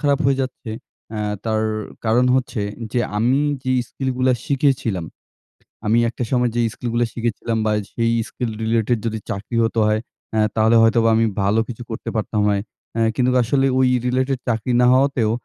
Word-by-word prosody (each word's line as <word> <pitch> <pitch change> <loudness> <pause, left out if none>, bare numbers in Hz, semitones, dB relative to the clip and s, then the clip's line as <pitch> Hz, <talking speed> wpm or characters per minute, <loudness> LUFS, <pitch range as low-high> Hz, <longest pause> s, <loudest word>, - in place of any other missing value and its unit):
খারাপ 140 -2 +2
হয়ে 135 0 +2
যাচ্ছে 130 -3 -6 0.4
অ্যা 105 -1 -3 0.2
তার 110 -1 0 0.4
কারণ 115 +3 +3
হচ্ছে 130 -3 -1 0.3
যে 125 - +1 0.2
আমি 120 +5 +2 0.2
যেই 130 -1 +1
স্কিলগুলা 130 -1 0
শিখেছিলাম, 130 - +1 0.8
আমি 110 +2 +3
একটা 120 - -4
সময়ে 125 -2 +2
যেই 120 -1 +2
স্কিলগুলা 120 -1 -1
শিখেছিলাম 115 -1 -2
বা 110 - +2 0.2
সেই 115 0 +1 0.2
স্কিল 125 -1 -3
রিলেটেড 115 +1 +1
যদি 110 -1 -2
চাকরি 100 +4 -3
হতো 115 0 0
হয়, 110 0 +1 0.3
অ্যা 110 - +2
তাহলে 110 +1 +4
হয়তোবা 115 0 +4
আমি 115 +1 +3 0.2
ভালো 100 +3 +2
কিছু 120 0 -7
করতে 110 - -5
পারতাম 105 -1 -1
হয়। 100 -1 +1 0.3
অ্যা 115 - +2
কিন্তুক 125 0 +2
আসলে 135 +3 +1
ওই 130 - +4 0.2
রিলেটেড 130 +1 0
চাকরি 115 +1 0
না - - +5
হওয়াতেও 130 -4 +2
115 Hz, 165 wpm, -21 LUFS, 110-130 Hz, 0.8 s, না